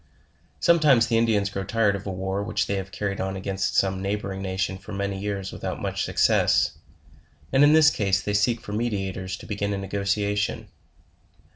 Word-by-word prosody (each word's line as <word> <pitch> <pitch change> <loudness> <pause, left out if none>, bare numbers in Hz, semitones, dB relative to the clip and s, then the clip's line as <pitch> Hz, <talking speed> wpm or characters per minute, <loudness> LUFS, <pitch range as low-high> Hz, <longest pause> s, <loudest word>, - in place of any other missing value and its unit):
Sometimes 150 -9 +5
the 115 -1 +1
Indians 105 -3 +1
grow 100 -1 -3
tired 105 0 +1
of 100 +1 -7
a - - -2
war, 95 +1 -2
which 100 - -1
they - - -2
have 95 0 -5
carried 100 +2 -3
on 95 0 -2
against 95 0 -2
some 95 -1 +1
neighboring 100 -1 -3
nation 95 0 -2
for 100 +2 -11
many 100 0 -2
years 100 -1 -3
without - - -5
much - - -2
success, - - +3 0.8
and 135 - +6
in 145 +1 +6
this 160 0 +6
case 100 -2 +1
they 105 +2 -3
seek 110 +3 +1
for 105 - -7
meditators 95 -4 -2
to - - -12
begin 100 -1 -2
a - - -2
negotiation. 100 +1 -1
100 Hz, 180 wpm, -25 LUFS, 95-105 Hz, 0.8 s, and